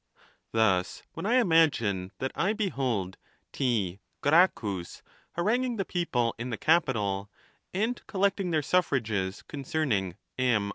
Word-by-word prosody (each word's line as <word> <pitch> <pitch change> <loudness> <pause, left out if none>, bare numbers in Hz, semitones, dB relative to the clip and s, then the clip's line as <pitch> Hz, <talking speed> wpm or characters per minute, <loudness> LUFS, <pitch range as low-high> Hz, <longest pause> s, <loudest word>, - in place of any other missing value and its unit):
Thus, 100 -5 +1
when 165 +5 -4
I 240 - +3
imagine 145 - +3
that 130 - -2
I 195 +4 +1
be 215 -3 -1
hold 115 - -2 0.3
T. 105 -9 0 0.2
Gracchus 120 - +2 0.3
hai 170 - 0
anguing 245 +3 +1
the 195 - -1
people 125 -10 0
in 120 +2 -3
the 115 - -3
Capitol, 105 - +1 0.4
and 220 +6 -1
collecting 195 -1 +1
their 155 -3 +1
suffrages 110 - 0
concerning 130 - -2 0.2
M. 115 -6 +2
130 Hz, 130 wpm, -28 LUFS, -, 0.4 s, I